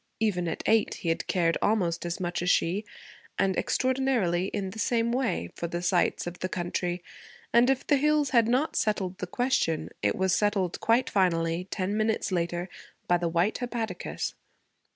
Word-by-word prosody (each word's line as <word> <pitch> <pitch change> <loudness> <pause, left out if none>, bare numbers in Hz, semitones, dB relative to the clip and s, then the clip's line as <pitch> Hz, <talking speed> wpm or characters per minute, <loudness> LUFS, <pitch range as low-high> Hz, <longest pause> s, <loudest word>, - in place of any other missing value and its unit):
even 190 -6 0
at 165 - -3
eight 225 -1 +3
he 170 - -3
had 165 - -1
cared 170 -2 +1
almost 175 -5 +1
as 170 - -3
much 175 -2 -2
as 175 - 0
she, 180 +4 +2 0.5
and 190 -1 +2
extraordinarily 255 -9 +1
in 195 -1 -3
the 220 - -9
same 230 +1 +1
way, 240 - -1
for 170 - -4
the 170 +1 -3
sights 180 0 +1
of 175 0 -6
the 185 - -2
country; 175 0 -2 0.5
and 240 +2 +5
if 270 0 +1
the 290 - +3
hills 300 0 +2
had 235 -3 +4
not 255 +6 +1
settled 195 -4 0
the 180 - -3
question, 245 -7 0
it 100 0 +1
was 190 -1 +1
settled, 205 -4 +1
quite 230 +3 +2
finally, 170 -2 +1
ten 195 +1 -2
minutes 215 -1 0
later, 175 0 -1 0.4
by 175 - +4
the 175 -1 0
white 170 +5 +1
hepaticas. 240 -2 -3
190 Hz, 175 wpm, -28 LUFS, 175-230 Hz, 0.5 s, and